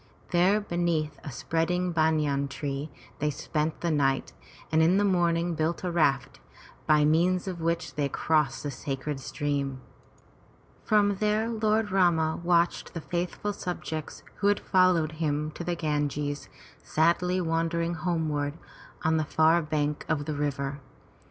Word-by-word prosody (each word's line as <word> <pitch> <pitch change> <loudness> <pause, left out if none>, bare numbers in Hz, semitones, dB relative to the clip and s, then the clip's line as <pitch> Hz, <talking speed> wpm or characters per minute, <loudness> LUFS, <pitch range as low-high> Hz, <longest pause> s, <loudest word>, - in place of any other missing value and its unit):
There 185 +4 +4
beneath 170 -6 -1
a 145 - -6
spreading 175 +6 -1
banyan 155 -4 +1
tree 140 +1 -4 0.3
they 150 - +1
spent 150 +2 -2
the 170 - 0
night 135 -3 +1 0.4
and 160 0 +4
in 170 +4 +4
the 205 - +3
morning 175 -2 +2
built 160 +2 -1
a 180 - -1
raft, 135 -5 +1 0.5
by 150 -1 +5
means 175 +4 +2
of 180 -3 -4
which 165 +1 -1
they 145 -2 -1
crossed 150 -2 +1
the 145 - -3
sacred 135 +1 -4
stream. 140 -1 -2 1.0
From 205 -2 +3
there 215 +2 +1
Lord 215 -1 +1
Rama 170 -4 +2
watched 170 0 +1
the 165 - -3
faithful 180 +5 -3
subjects 160 -5 -5
who 200 - +1
had 205 0 +3
followed 185 -4 +3
him 155 -1 -1
to 175 - -7
Ganges, 145 -2 -2 0.3
sadly 175 +3 +2
wending 165 0 0
homeward 155 -4 -1 0.5
on 160 0 +2
the 155 - +1
far 160 +3 +3
bank 150 -1 -1
of 150 -3 0
the 155 - -2
river. 140 -1 -2
160 Hz, 140 wpm, -28 LUFS, 150-175 Hz, 1.0 s, by